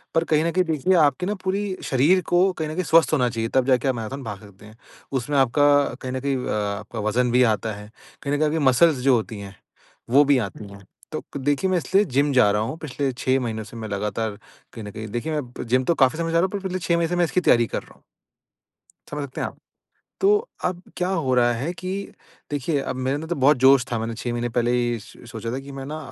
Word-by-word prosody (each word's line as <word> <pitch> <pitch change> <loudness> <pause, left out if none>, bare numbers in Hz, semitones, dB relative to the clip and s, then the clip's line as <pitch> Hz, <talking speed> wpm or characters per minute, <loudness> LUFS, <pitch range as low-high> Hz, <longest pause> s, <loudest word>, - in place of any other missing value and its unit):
पर 165 - +3
कहीं 155 -1 +2
न 170 - +1
कहीं 185 +2 +2
देखिए 160 +3 +1
आपके 150 +2 +3
न 205 - -1
पूरी 195 +1 -1
शरीर 150 +8 +3
को 175 - +2 0.2
कहीं 160 -3 -3
न 155 - -4
कहीं 185 - -1
स्वस्थ 165 -1 +4
होना 125 -5 +3
चाहिए 115 -1 -3
तब 130 -1 +4
जाके 130 0 +2
आप 130 - +1
मैराथन 120 +5 -5
भाग 105 -4 -6
सकते 100 -1 -15
हैं। 110 +1 -15 0.4
उसमें 140 +4 -2
आपका 135 +1 +3 0.4
कहीं 130 - -4
न 130 - -2
कहीं 140 0 0
अ, - - -2 0.3
आपका 110 +2 -8
वज़न 120 +4 +1
भी 125 +1 +5
आता 110 +1 -4
है, 105 +1 -10 0.4
कहीं 140 - -1
न - - +2
कहीं 155 +1 +2
आपकी 160 +2 0
मसल्स 150 +4 +4
जो 135 -1 +5
होती 110 -2 -3
हैं 100 -1 -9 0.6
वो 140 +4 +6
भी 140 -1 +4
आती 100 +2 -10
हैं। 100 0 -13 0.3
तो - - -4 0.2
देखिए, 145 +7 0
मैं 185 - +2
इसलिए 190 +5 +2
जिम 145 0 +3
जा 125 -6 +5
रहा 105 +1 +1
हूँ, 115 +8 -3
पिछले 140 -3 -3
6 130 +1 0
महीनों 110 -3 -3
से 110 - -12
मैं 110 -1 -6
लगातार 105 +1 -3 0.3
कहीं 115 - -8
न 105 - -7
कहीं। 110 +1 -7
देखिए 150 +8 -2
मैं 125 -2 -8
जिम 130 +2 +2
तो 170 - +2
काफ़ी 135 +1 +3
समय 165 0 -2
जा 165 - +3
रहा - - +3
हूँ 190 - -1
पर 200 - -3
पिछले 185 -1 -2
6 170 -1 +1
महीने 170 -1 +1
से 175 - -1
मैं 175 - +3
इसकी 170 +2 0
तैयारी 120 -8 +4
कर - - -4
रहा - - -18
हूँ। - - -27 1.1
समझ 145 0 -3
सकते 135 -2 -6
हैं - - -1
आप? - - -11 0.6
तो 420 +4 +3 0.2
अब 180 -1 -2
क्या 180 0 -1
हो 135 -9 0
रहा 120 -1 +4
है 135 +9 -3
कि 185 +1 -6 0.6
देखिए 145 +1 -1
अब 130 - -4
मेरे 130 +1 -1
अंदर 150 +3 -4
तो 175 - -1
बहुत 140 +2 +4
जोश 135 -1 +7
था 120 - 0
मैंने 115 +1 -3
6 120 +1 -4
महीने 120 0 -2
पहले 120 0 0
ही 120 -1 0
स - - -15 0.2
सोचा 115 0 -5
था 130 - -2
कि 140 - -9
मैं 135 -1 -7
ना 155 +2 -5
135 Hz, 260 wpm, -23 LUFS, 115-160 Hz, 1.1 s, जोश